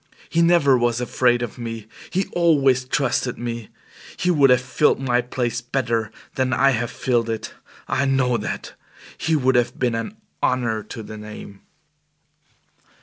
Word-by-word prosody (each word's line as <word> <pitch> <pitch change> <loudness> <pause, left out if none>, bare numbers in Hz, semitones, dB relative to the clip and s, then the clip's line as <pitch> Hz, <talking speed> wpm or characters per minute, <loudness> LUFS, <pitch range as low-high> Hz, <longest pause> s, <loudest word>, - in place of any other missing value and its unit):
He 165 - +3
never 165 -6 +5
was 120 -1 +1
afraid 120 0 +2
of 120 +1 -6
me 115 -2 -5 0.2
he 190 +1 0
always 140 -7 +3
trusted 125 -2 0
me. 120 -2 -5 0.5
He 180 - +1
would 145 -5 +5
have 125 -1 +6
filled 130 +3 +2
my 125 -2 +1
place 120 -1 -2
better 120 -3 -1 0.2
than 130 -1 0
I 135 +3 +4
have 120 -1 -1
filled 120 -2 0
it. 110 -1 -4 0.3
I 140 - +1
know 130 -2 +2
that. - - -5 0.4
He 160 0 0
would 130 -3 +2
have 120 0 +1
been 125 -2 +1
an 115 - -4 0.2
honor 120 -4 +1
to 110 +2 -8
the 110 0 -9
name." 105 -2 -10
125 Hz, 155 wpm, -22 LUFS, 115-135 Hz, 0.5 s, have